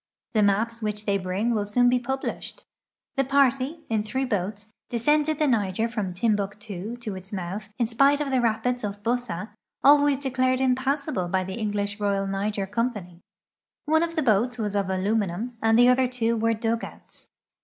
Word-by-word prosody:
The 215 - +3
maps 215 +3 +1
whicli 210 -1 -3
they 200 -1 +1
bring 190 +6 -1
will 210 -2 0
soon 245 +4 +2
be 250 0 +3
published. 265 - -5 0.6
Tiie 270 - +2
l)arty, 275 +3 +2
in 220 -2 0
three 240 +6 -2
boats, 205 -1 -3 0.2
descended 295 +6 +2
the 305 - +2
Niger 220 -4 +1
from 210 -5 -3
Timbuktu 205 +1 -2
to 220 -5 -5
its 185 +1 -9
mouth, 200 +2 -5
in 240 - +2
spite 275 +5 +3
of 290 -2 -2
the 260 -2 +2
rapids 235 +2 0
of 205 0 -5
Bussa, 230 -4 -2 0.3
always 285 0 +6
declared 255 -1 0
imi)awsable 265 - 0
by 185 +1 +1
the 190 +1 -6
English 205 -1 -2
Koyal 200 -1 0
Niger 195 +1 -2
Company. 205 -5 -3 0.6
One 315 +1 +3
of 335 0 -2
the 315 - +1
boats 240 +1 +2
was 210 -3 -2
of 200 -2 0
aluminum 200 +3 -1
and 225 0 +4
the 245 +1 +7
other 250 +1 +4
two 235 -2 0
were 225 0 +1
dug 225 +1 -1
outs. - - -10
225 Hz, 175 wpm, -25 LUFS, 205-255 Hz, 0.6 s, the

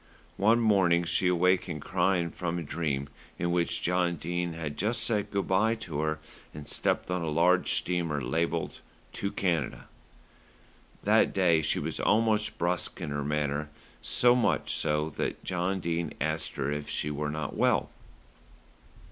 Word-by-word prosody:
One 110 +4 +4
morning 95 -6 +3
she 85 +2 +1
awakened 90 -3 +1
crying 90 -3 +1
from 85 -1 -3
a 85 - -3
dream 70 -3 -2 0.3
in 85 0 -1
which 85 -1 0
John 90 -1 +1
Dene 85 +1 -3
had 80 -3 -5
just 110 +5 0
said 105 -3 0
good 100 -1 -2
day 110 +5 +3
to 85 -10 -5
her 80 0 -1 0.4
and 75 -1 -8
stepped - - -1
on 90 -1 0
a 80 - -2
large 85 +4 +3
steamer 85 -4 0
labelled 80 +5 -2 0.3
"To 100 - -3
Canada." 85 -7 -1 1.2
That - - +3
day 85 -4 +4
she 75 - +1
was - - -3
almost 110 0 +2
brusque 85 +1 -1
in - - -4
her 75 0 -2
manner, 75 0 -1 0.3
so 120 0 +4
much 125 -1 +1
so 75 0 0
that - - -3
John 95 +1 -1
Dene 85 -2 -2
had 80 - +1
asked 80 0 -4
her 70 0 -1
if 75 0 -4
she 75 - -1
were 75 0 -2
not 75 +1 -4
well. - - +2
85 Hz, 160 wpm, -29 LUFS, 75-95 Hz, 1.2 s, One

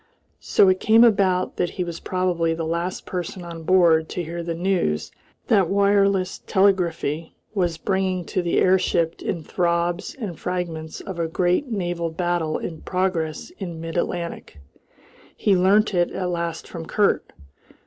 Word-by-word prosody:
So 195 - +4
it 185 0 +3
came 225 +2 +6
about 195 -5 +3
that 175 - +1
he 180 - 0
was 170 -1 -6
probably 175 -3 0
the 165 0 -3
last 170 +3 -3
person 180 0 -5
on 170 -1 -8
board 165 -2 +4
to 180 - -3
hear 170 +1 -5
the 170 0 -3
news 170 - 0 0.3
that 195 -6 +3
wireless 200 -1 +2
telegraphy 170 -5 +1 0.2
was 175 -5 0
bringing 190 0 -1
to 185 - -1
the 170 -1 0
airship 175 -3 +2
in 170 -5 -3
throbs 170 +1 -1
and 205 - -6
fragments 170 -3 -4
of 190 -3 -7
a 165 - 0
great 180 - +1
naval 175 -6 -2
battle 170 -1 -1
in 160 -2 -6
progress 180 - -2
in 175 -5 -5
mid 165 0 -6
Atlantic. 170 - -3 0.8
He 200 - +3
learnt 200 +4 +3
it 175 -1 +2
at 185 -1 -3
last 170 -1 -3
from 165 -2 -7
Kurt. 205 +3 +1
175 Hz, 155 wpm, -23 LUFS, 165-190 Hz, 0.8 s, came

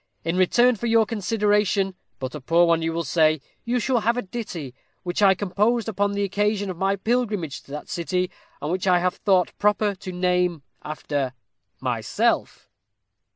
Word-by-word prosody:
In 165 +1 -1
return 240 +7 +4
for 235 - -3
your 225 -1 +4
consideration, 210 -2 +1 0.2
but 130 -1 -5
a 150 - -6
poor 170 +6 +4
one 165 -1 +3
you 165 0 0
will 170 +1 -2
say, 155 -2 +3 0.3
you 245 +1 +1
shall 250 +1 +1
have 235 +2 +1
a 245 - -1
ditty, 185 - -6 0.3
which 175 +2 -2
I 195 -2 +6
composed 210 +5 0
upon 205 -1 0
the 200 0 0
occasion 205 0 0
of 175 - -8
my 195 +2 +1
pilgrimage 210 - -1
to - - -23
that 150 - -6
city, 180 +1 -1 0.3
and 150 - -1
which 185 +1 -1
I 180 -1 +5
have 180 +1 0
thought 185 -3 +2
proper 210 0 +2
to 185 -1 -8
name 180 -3 0 0.2
after 145 -3 -3 0.5
myself." - - -1
190 Hz, 175 wpm, -24 LUFS, 170-210 Hz, 0.5 s, I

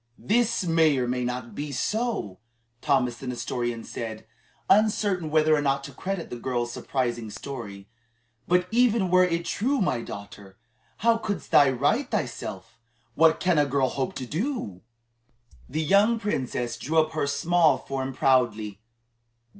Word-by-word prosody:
"This 230 0 +1
may 165 -4 +3
or 125 -1 0
may 125 0 -1
not 125 -1 -4
be 145 0 -5
so," 205 - -2 0.4
Thomas 125 -4 +1
the 135 - -8
Nestorian 120 -1 -3
said, 110 -2 -6 0.4
uncertain 205 -5 +2
whether 155 0 +4
or 150 - 0
not 140 -1 0
to 140 - -8
credit 190 +4 -4
the 120 - -6
girl's 120 -1 -2
surprising 120 -4 -2
story; 105 -5 -8 0.6
"but 180 0 +2
even 230 -5 +3
were 185 0 +6
it 170 -1 0
true, 265 +10 0
my 130 - 0
daughter, 100 -2 -10 0.5
how 230 -1 +5
couldst 205 -3 -4
thou 145 -2 +6
right 145 - +1
thyself? 110 -3 -4 0.3
What 160 +4 +4
can 180 -4 +2
a 145 - +4
girl 135 -1 +1
hope 135 0 -3
to 130 - -4
do?" 155 - -3 0.9
The 155 +4 -1
young 200 +8 +4
princess 125 - -2
drew 160 +4 -2
up 155 0 +3
her 155 -2 -1
small 160 +3 +3
form 135 -1 -4
proudly. 115 -6 +1
140 Hz, 150 wpm, -26 LUFS, 120-180 Hz, 0.9 s, were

